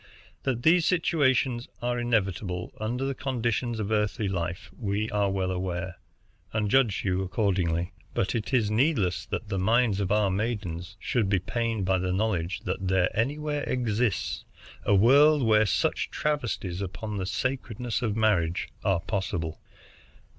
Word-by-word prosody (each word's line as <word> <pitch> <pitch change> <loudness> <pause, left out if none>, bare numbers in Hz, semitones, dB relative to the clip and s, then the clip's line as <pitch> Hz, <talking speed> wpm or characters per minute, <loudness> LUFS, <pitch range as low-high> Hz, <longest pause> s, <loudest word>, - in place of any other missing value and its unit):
That 125 -3 -2
these 165 +1 +5
situations 135 -8 +2
are 120 0 -1
inevitable 100 -6 -1
under 120 +5 -2
the 135 - -1
conditions 120 -3 -1
of 105 0 -2
earthly 105 0 0
life 90 -2 -3
we 105 -1 -2
are 105 -1 +1
well 95 -1 -1
aware, 90 0 -3 0.6
and 105 -2 0
judge 130 -7 +3
you 95 -1 +1
accordingly; 90 -3 0 0.2
but 95 - 0
it 115 -2 -2
is 115 -5 +2
needless 105 - +1
that 110 - -4
the 95 -2 -1
minds 110 +1 +3
of 100 -1 -1
our 105 -2 +3
maidens 95 -5 -3
should 110 -6 0
be 100 - +3
pained 115 +2 -1
by 95 0 +2
the 90 0 -1
knowledge 95 -3 -1
that 95 - -3
there 90 -1 +2
anywhere 145 +5 -1
exists 115 -5 0 0.4
a 100 - +4
world 140 +8 +6
where 110 -2 +4
such - - 0
travesties 120 -11 -2
upon 100 +3 -4
the 95 -1 -2
sacredness 125 0 -2
of 110 -4 0
marriage 90 -7 +1
are 95 -4 +2
possible. 90 -4 -3
105 Hz, 150 wpm, -27 LUFS, 95-120 Hz, 0.6 s, world